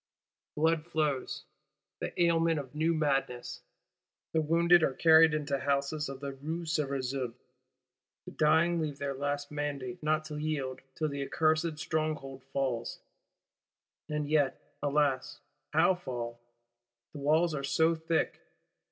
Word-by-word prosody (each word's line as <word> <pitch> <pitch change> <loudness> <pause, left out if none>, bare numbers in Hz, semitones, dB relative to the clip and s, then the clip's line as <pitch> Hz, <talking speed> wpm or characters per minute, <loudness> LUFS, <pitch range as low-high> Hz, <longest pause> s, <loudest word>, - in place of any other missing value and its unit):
Blood 160 +1 +1
flows, 150 -5 -1 0.6
the - - -3
aliment 165 -1 +2
of 135 -2 -8
new 160 +2 +1
madness. 135 -6 -1 0.7
The 160 - +3
wounded 170 +2 +5
are 135 -4 +1
carried 160 -1 +6
into 145 -2 -1
houses 140 +2 0
of 135 -1 -7
the 140 -1 -4
Rue 160 +5 -5
Cerisaie; 135 -5 -2 0.9
the - - -8
dying 160 +2 +3
leave 150 -3 -3
their 140 -1 -2
last 145 +1 -3
mandate 145 -4 -4
not 155 0 +1
to 150 -1 -5
yield 145 -4 -2
till 155 -1 -1
the 140 -1 -4
accursed 155 +2 +1
Stronghold 155 -4 -3
fall. 130 -4 -1 1.2
And 150 -1 -2
yet, 145 -2 +2 0.2
alas, 145 -1 +1 0.3
how 165 +4 +5
fall? 120 -9 -5 0.7
The 150 - -7
walls 155 +4 +3
are 140 -2 -3
so 160 +4 +3
thick! 160 0 -1
150 Hz, 130 wpm, -31 LUFS, 140-160 Hz, 1.2 s, carried